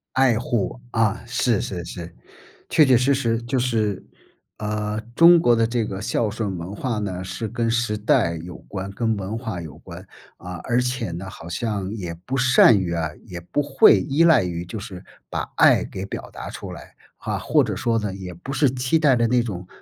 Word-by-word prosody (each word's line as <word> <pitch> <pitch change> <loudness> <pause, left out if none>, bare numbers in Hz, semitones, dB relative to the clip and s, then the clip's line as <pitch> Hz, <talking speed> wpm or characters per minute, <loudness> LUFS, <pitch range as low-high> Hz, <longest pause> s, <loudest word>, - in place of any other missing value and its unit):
爱 130 -4 +4
护， 120 0 -2
啊， 110 -2 +1
是 120 -2 +1
是 90 -3 -4
是， 85 0 -8 0.6
确 155 - +5
确 130 - +5
实 130 +3 +3
实 115 -3 0
就 120 +3 -2
是， 110 -5 0 0.5
呃， 105 0 -2
中 170 +1 +8
国 120 -7 +4
的 115 0 +3
这 115 -1 -1
个 95 - -5
孝 115 -1 0
顺 105 -2 -3
文 90 +4 -6
化 115 -1 -2
呢， 95 -3 -4
是 95 +5 -4
跟 115 +1 -1
时 115 -3 0
代 85 -5 +2
有 85 +1 -8
关、 95 0 -5
跟 110 +2 -1
文 100 +3 -4
化 110 -5 -4
有 80 -4 -8
关， 90 +2 -11 0.3
啊， 90 +1 -8
而 120 0 +2
且 125 -4 -1
呢， 90 +3 -6
好 85 - -10
像 100 +1 -3
也 90 -6 -5
不 135 - -1
善 125 -3 +6
于 90 -2 -2
啊， 80 -2 -1 0.2
也 90 -6 -7
不 90 +12 -1
会 135 -8 +5
依 140 - +2
赖 160 - +6
于 85 -1 -3
就 90 +6 -7
是 100 -4 -8 0.3
把 - - -3
爱 - - +5
给 95 - -6
表 - - -7
达 - - -8
出 - - -8
来， - - -11 0.2
哈， - - -3
或 - - +3
者 - - -3
说 115 -1 0
呢， 105 -3 -2
也 90 -2 -8
不 135 +11 -7
是 145 0 +3
期 130 +5 0
待 145 -4 +4
的 120 -1 +2
那 125 +1 +3
种， 95 -6 -5
110 Hz, 220 characters per minute, -23 LUFS, 95-120 Hz, 0.6 s, 中